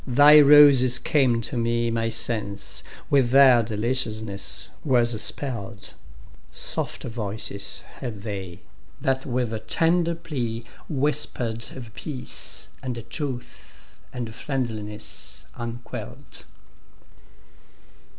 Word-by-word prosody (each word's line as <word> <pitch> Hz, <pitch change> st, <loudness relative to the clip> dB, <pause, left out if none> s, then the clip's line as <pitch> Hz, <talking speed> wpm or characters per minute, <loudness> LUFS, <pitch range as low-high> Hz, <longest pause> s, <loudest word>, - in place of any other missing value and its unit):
thy 145 Hz, +4 st, +8 dB
roses 140 Hz, -4 st, +8 dB
came 130 Hz, -6 st, +2 dB
to 115 Hz, -, -4 dB
meMy 115 Hz, -1 st, 0 dB
sense 110 Hz, -3 st, -2 dB, 0.3 s
with 135 Hz, -4 st, +4 dB
their 130 Hz, -2 st, +7 dB
deliciousness 110 Hz, -2 st, -1 dB
was 120 Hz, -5 st, +2 dB
spell'd:Soft 100 Hz, -, -3 dB
voices 105 Hz, -2 st, -4 dB, 0.2 s
had 110 Hz, -7 st, -6 dB
they, 95 Hz, -5 st, -6 dB, 0.4 s
that 135 Hz, +1 st, -1 dB
with 115 Hz, -3 st, -2 dB
tender 170 Hz, +7 st, +2 dB
pleaWhisper'd 125 Hz, -3 st, -3 dB
of 120 Hz, -4 st, -9 dB
peace, 130 Hz, +5 st, -5 dB
and 120 Hz, -3 st, -5 dB
truth, 120 Hz, -7 st, -7 dB, 0.2 s
and 120 Hz, -3 st, -5 dB
friendliness 105 Hz, -7 st, -4 dB
unquell'd. 120 Hz, 0 st, -6 dB
120 Hz, 80 wpm, -25 LUFS, 110-130 Hz, 0.4 s, thy